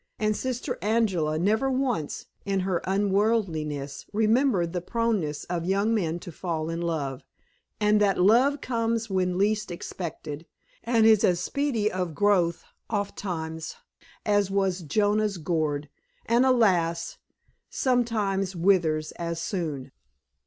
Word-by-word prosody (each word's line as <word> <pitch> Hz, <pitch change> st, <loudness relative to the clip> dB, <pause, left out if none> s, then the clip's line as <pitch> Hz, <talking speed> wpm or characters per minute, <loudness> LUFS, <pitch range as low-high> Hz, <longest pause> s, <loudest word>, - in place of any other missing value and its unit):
And 215 Hz, 0 st, +1 dB
Sister 250 Hz, +2 st, -3 dB
Angela 195 Hz, -8 st, +1 dB
never 220 Hz, +10 st, +2 dB
once, 255 Hz, -, -1 dB, 0.2 s
in 195 Hz, -1 st, 0 dB
her 185 Hz, -2 st, -1 dB
unworldliness, 190 Hz, -8 st, 0 dB
remembered 215 Hz, -4 st, +2 dB
the 180 Hz, -, -2 dB
proneness 205 Hz, -8 st, -1 dB
of 175 Hz, -1 st, -3 dB
young 200 Hz, +4 st, +2 dB
men 170 Hz, -7 st, 0 dB
to 175 Hz, -, -8 dB
fall 160 Hz, -1 st, -3 dB
in 165 Hz, +1 st, -3 dB
love, 145 Hz, -6 st, -2 dB, 0.6 s
and 210 Hz, 0 st, +3 dB
that 200 Hz, -2 st, +3 dB
love 245 Hz, +9 st, +4 dB
comes 230 Hz, -2 st, -1 dB
when 185 Hz, -1 st, 0 dB
least 210 Hz, +1 st, +1 dB
expected, 165 Hz, -3 st, -6 dB, 0.4 s
and 230 Hz, -1 st, +3 dB
is 220 Hz, -2 st, +6 dB
as 175 Hz, -1 st, +3 dB
speedy 235 Hz, 0 st, 0 dB
of 180 Hz, -4 st, -3 dB
growth, 185 Hz, -5 st, +2 dB, 0.3 s
ofttimes, 170 Hz, -6 st, -4 dB, 0.5 s
as 205 Hz, -2 st, +2 dB
was 195 Hz, -2 st, +1 dB
Jonah's 205 Hz, +4 st, +1 dB
gourd, 155 Hz, -3 st, -1 dB, 0.4 s
and, 240 Hz, +3 st, +3 dB
alas! 180 Hz, -9 st, +2 dB, 0.5 s
sometimes 210 Hz, -7 st, 0 dB
withers 165 Hz, -4 st, +2 dB
as 170 Hz, -1 st, -3 dB
soon. 155 Hz, -8 st, -3 dB
195 Hz, 125 wpm, -26 LUFS, 170-220 Hz, 0.6 s, is